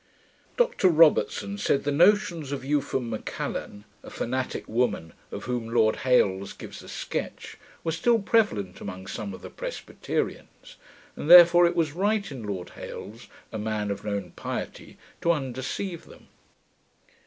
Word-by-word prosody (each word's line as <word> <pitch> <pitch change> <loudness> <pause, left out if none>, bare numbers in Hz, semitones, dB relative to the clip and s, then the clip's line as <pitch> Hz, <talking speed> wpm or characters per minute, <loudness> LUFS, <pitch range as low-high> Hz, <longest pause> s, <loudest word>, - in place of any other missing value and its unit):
Dr 480 - +3
Robertson 150 - +3
said, 135 - +1
the 145 - 0
notions 170 -2 +3
of 140 -2 -4
Eupham 135 -3 0
Macallan. 105 -1 -5 0.2
a - - -11
fanatick 130 +2 -3
woman, 110 -9 -1 0.2
of - - -6
whom 120 -2 -3
Lord 110 -2 +3
Hailes 100 -7 +2
gives - - -10
a - - -12
sketch, - - -5 0.2
were 165 - -1
still 230 +9 +3
prevalent 195 - +1
among 95 -1 -7
some 100 +1 -5
of 95 - -10
the - - -8
Presbyterians; - - -5 0.4
and 150 - -5
therefore 175 0 +9
it 175 - -2
was 165 -3 +1
right 200 +2 0
in 130 -4 -7
Lord 95 -4 -5
Hailes, 115 +3 -9 0.2
a 110 - -4
man 105 -1 -2
of 100 - -5
known 100 -4 -3
piety, - - -6 0.2
to 170 - +3
undeceive 140 +6 -4
them. - - -17
130 Hz, 145 wpm, -26 LUFS, 105-170 Hz, 0.4 s, therefore